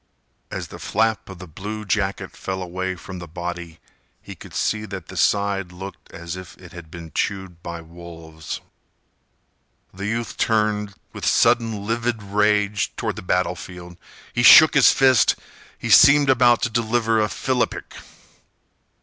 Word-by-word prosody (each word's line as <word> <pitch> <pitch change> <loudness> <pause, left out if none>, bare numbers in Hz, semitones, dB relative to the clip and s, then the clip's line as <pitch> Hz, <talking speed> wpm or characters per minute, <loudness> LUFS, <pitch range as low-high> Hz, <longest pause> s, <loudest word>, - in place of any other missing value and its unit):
As - - -6
the - - -10
flap 110 0 0
of 95 - -9
the 90 - -9
blue 105 +6 -7
jacket 100 -1 -2
fell 95 -1 -4
away 95 +1 -4
from 90 +1 -9
the 85 - -9
body, 85 0 -6 0.4
he - - -10
could - - -13
see 110 0 -1
that 95 -2 -8
the 95 - -9
side 100 -1 +1
looked 95 +2 -10
as 85 +1 -7
if 95 -1 -10
it 90 -2 -14
had 85 -2 -11
been 85 -1 -10
chewed 95 -4 -3
by 85 -1 -7
wolves. 80 -1 -9 1.3
The 100 +2 -5
youth 115 +1 -3
turned, 105 -2 0 0.2
with - - -9
sudden, 115 -3 +2
livid 115 0 -2
rage, 105 0 +1
toward - - -3
the - - -7
battlefield. 90 -1 -3 0.4
He 120 - 0
shook 155 +6 +9
his 135 -3 +6
fist. 130 -5 +4 0.4
He - - -4
seemed 140 0 +7
about 120 -2 +4
to 125 - 0
deliver 115 -1 +1
a 105 - 0
philippic. 130 +1 -2
100 Hz, 150 wpm, -22 LUFS, 90-110 Hz, 1.3 s, shook